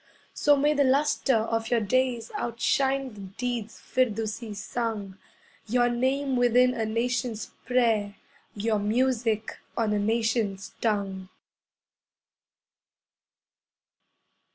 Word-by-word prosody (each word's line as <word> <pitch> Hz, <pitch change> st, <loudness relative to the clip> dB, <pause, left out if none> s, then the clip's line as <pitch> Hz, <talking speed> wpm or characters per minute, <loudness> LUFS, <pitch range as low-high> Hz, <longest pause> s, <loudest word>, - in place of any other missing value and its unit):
So 290 Hz, -1 st, +4 dB
may 295 Hz, +2 st, +3 dB
the 285 Hz, -1 st, +3 dB
lustre 275 Hz, -1 st, +2 dB
of 225 Hz, 0 st, 0 dB
your 240 Hz, -, +3 dB
days 240 Hz, +1 st, 0 dB
Outshine 265 Hz, +2 st, 0 dB
the 210 Hz, -, -12 dB
deeds 225 Hz, +3 st, -4 dB
Firdusi 225 Hz, -2 st, -1 dB
sung, 205 Hz, -2 st, -4 dB, 0.5 s
Your 240 Hz, +2 st, +3 dB
name 260 Hz, +3 st, 0 dB
within 245 Hz, +1 st, +4 dB
a 225 Hz, -3 st, -2 dB
nation's 230 Hz, 0 st, -2 dB, 0.2 s
prayer, 225 Hz, -5 st, +2 dB, 0.4 s
Your 215 Hz, +1 st, 0 dB
music 225 Hz, 0 st, 0 dB, 0.2 s
on 220 Hz, -2 st, +1 dB
a 210 Hz, -, +1 dB
nation's 220 Hz, -2 st, 0 dB
tongue. 195 Hz, -4 st, -1 dB
230 Hz, 100 wpm, -27 LUFS, 215-250 Hz, 0.5 s, So